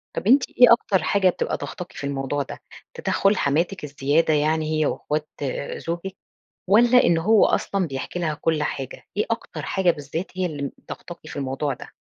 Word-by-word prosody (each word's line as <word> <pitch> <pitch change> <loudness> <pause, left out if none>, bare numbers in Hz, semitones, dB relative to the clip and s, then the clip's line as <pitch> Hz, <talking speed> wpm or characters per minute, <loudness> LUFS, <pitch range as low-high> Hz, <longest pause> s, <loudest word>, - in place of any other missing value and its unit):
طَب - - -3
أنتِ 260 +3 +6
إيه 245 -1 +6
أكتر 200 -5 +1
حاجة 195 -2 +3
بتبقى - - -2
ضاغطاكِ 180 - -7
في - - -8
الموضوع 140 +1 -2
ده؟ - - -9 0.3
تدخُّل 195 +2 +1
حماتِك 165 +7 0
الزيادة 150 +2 +1
يعني 155 +1 +1
هي 155 - +2
وإخوات 150 +1 -2
آآ، 140 0 -3
زوجِك؟ 170 +3 -5 0.5
والَّا 240 +4 +6
إن 170 -1 +4
هو 210 +5 +5
أصلًا 195 -2 0
بيحكي 135 +4 -5
لها 160 -3 -1
كُلّ 160 0 0
حاجة؟ 135 -3 -4
إيه 210 - +2
أكتر 230 - -4
حاجة 190 -2 +1
بالذات 160 +3 -4
هي 185 - +1
اللي 145 -4 -4 0.2
ضاغطاكِ 175 -1 -8
في - - -9
الموضوع 135 0 -2
ده؟ - - -11
165 Hz, 180 wpm, -23 LUFS, 145-190 Hz, 0.5 s, أنتِ